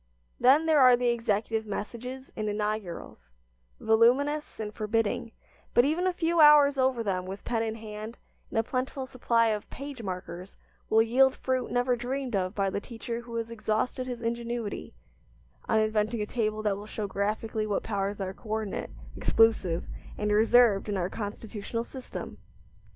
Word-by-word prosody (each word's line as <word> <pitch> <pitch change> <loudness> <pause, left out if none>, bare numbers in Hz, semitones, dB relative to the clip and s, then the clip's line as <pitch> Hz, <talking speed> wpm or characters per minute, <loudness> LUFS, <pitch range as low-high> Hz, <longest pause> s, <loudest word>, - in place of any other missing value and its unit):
Then 275 +6 +5
there 315 -2 +4
are 255 -2 +8
the 245 0 +1
executive 225 -1 0
messages 250 +6 -6
and 215 -1 -2
inaugurals 210 - -4 0.5
voluminous 260 +8 +2
and 210 -1 -4
forbidding, 220 +1 -1 0.4
but 240 - +6
even 330 +6 +1
a - - +3
few 340 -1 0
hours 295 -2 +7
over 260 -3 +2
them 185 -3 -2
with 195 +2 -7
pen 230 -2 0
in 220 -1 -2
hand 215 +1 -8 0.3
and - - -4
a 225 - +3
plentiful 260 +2 -3
supply 235 -3 +2
of 210 -1 -3
page 275 -2 -7
markers 185 -1 -6 0.3
will 220 0 +5
yield 260 +3 +4
fruit 255 -1 -1
never 245 0 +1
dreamed 250 0 -3
of 185 0 -1
by 195 -1 0
the 200 - -2
teacher 230 +1 -6
who 235 0 -9
has 230 0 -3
exhausted 230 +3 -1
his 245 -2 -5
ingenuity 235 - -3 0.7
on 220 - +4
inventing 215 +1 +1
a - - -2
table 215 -1 -2
that 205 -2 +1
will 205 +1 -9
show 215 -1 -4
graphically 215 +2 -2
what 205 - -1
powers 200 -1 -2
are 190 -1 -3
coordinate, 215 0 -4 0.3
exclusive, 210 -7 +2 0.3
and 210 0 -1
reserved 220 -1 +4
in 200 - -1
our 180 0 -1
constitutional 215 +1 -5
system! 260 +1 -8
225 Hz, 160 wpm, -28 LUFS, 210-250 Hz, 0.7 s, are